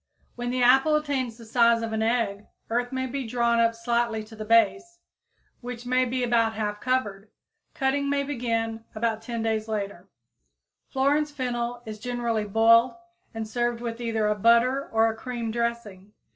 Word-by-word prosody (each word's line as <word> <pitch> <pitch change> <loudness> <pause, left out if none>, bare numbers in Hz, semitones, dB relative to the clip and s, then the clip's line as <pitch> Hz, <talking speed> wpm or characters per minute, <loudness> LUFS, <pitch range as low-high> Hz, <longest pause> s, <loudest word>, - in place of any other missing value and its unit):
When 245 0 -4
the 250 0 0
"apple" 270 +5 +5
attains 270 -6 -1
the 230 - -12
size 235 0 +3
of 225 -1 -3
an 220 - -1
egg, 220 -3 0 0.2
earth 245 +1 0
may 260 0 -2
be 260 -1 -4
drawn 235 0 +1
up 230 0 +3
slightly 230 -1 -1
to 220 +1 -13
the 215 - -6
base, 230 - +2 0.6
which 245 -1 -7
may 255 +1 +2
be 250 +1 -2
about 230 -2 +2
half 210 -1 -3
covered; 215 -6 -1 0.5
cutting 280 +1 0
may 280 0 +1
begin 230 -5 -2
about 220 0 -1
10 230 0 -4
days 220 -1 -1
later. 200 -4 -4 0.8
Florence 285 +3 +1
fennel 245 -3 -3
is 215 -1 -7
generally 235 -2 -2
boiled 230 +3 +4 0.4
and 220 -1 -4
served 240 +1 -1
with 235 0 -5
either 225 -2 -1
a 210 - +2
butter 235 +6 +3
or 225 0 +4
a 225 - -2
cream 235 -1 -4
dressing. 230 -4 -3
235 Hz, 170 wpm, -26 LUFS, 225-250 Hz, 0.8 s, apple